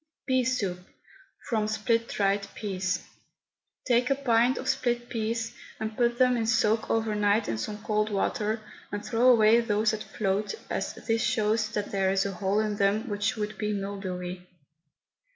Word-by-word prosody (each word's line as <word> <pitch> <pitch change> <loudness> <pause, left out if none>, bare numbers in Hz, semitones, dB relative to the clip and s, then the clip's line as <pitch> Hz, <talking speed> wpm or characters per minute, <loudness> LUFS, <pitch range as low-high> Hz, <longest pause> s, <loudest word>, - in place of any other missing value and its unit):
PEA 260 -1 +2
SOUP, 205 -8 -1 0.7
FROM 220 -3 0
SPLIT 230 +2 0
DRIED 200 0 0
PEAS. 190 -4 -2 0.8
Take 245 0 +3
a 275 - +3
pint 245 -2 +2
of - - -5
split 240 -1 0
peas 225 0 -2 0.2
and 220 0 -4
put 240 0 +1
them 250 -1 +4
in 225 -2 -1
soak 220 -1 +2
overnight 210 -1 +1
in 110 - -2
some 210 - -5
cold 215 0 +1
water, 215 +2 -1 0.3
and 205 0 -4
throw 245 +2 +3
away 230 -1 +6
those 215 -1 +1
that 220 -1 -4
float, 210 - -2 0.2
as - - -2
this 225 -1 -1
shows 220 -2 +1
that 205 -1 -2
there 195 -1 +1
is 195 0 +1
a 200 - -1
hole 195 +2 0
in 210 -1 -2
them 205 +4 +1
which 205 +4 0
would 210 -2 -4
be 210 0 -1
mildewy. 185 -3 -4
215 Hz, 165 wpm, -28 LUFS, 205-230 Hz, 0.8 s, away